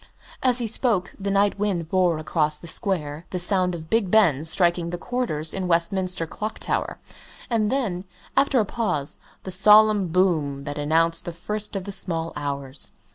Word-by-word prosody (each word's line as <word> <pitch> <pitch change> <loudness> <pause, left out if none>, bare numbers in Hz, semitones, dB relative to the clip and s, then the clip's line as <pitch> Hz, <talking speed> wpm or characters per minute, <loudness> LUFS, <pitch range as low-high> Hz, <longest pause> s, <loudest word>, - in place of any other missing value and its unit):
As 250 -2 +3
he 240 - -1
spoke, 215 -4 0
the 200 0 -2
night 200 0 +2
wind 190 -6 -1
bore 180 -2 +2
across 155 -1 0
the 170 - -12
square 160 -3 -2
the 185 - -3
sound 180 0 +1
of 160 -1 -8
Big 225 -4 +2
Ben 175 -9 +4
striking 170 +1 +1
the 175 - -4
quarters 175 -9 -1
in 190 -1 -3
Westminster 180 +1 +1
Clock 215 +6 -5
Tower, - - -2 0.5
and 215 -2 +1
then, 200 -9 -1 0.3
after 275 -2 +3
a 215 - +2
pause, 180 -11 -1 0.2
the 190 - -6
solemn 210 +1 +5
boom 160 -6 +1
that 145 +1 -5
announced 165 +3 +1
the 175 - -5
first 210 +5 -5
of 195 - -2
the 200 - -6
small 165 -4 -2
hours. 140 -2 -3
180 Hz, 175 wpm, -24 LUFS, 160-205 Hz, 0.5 s, solemn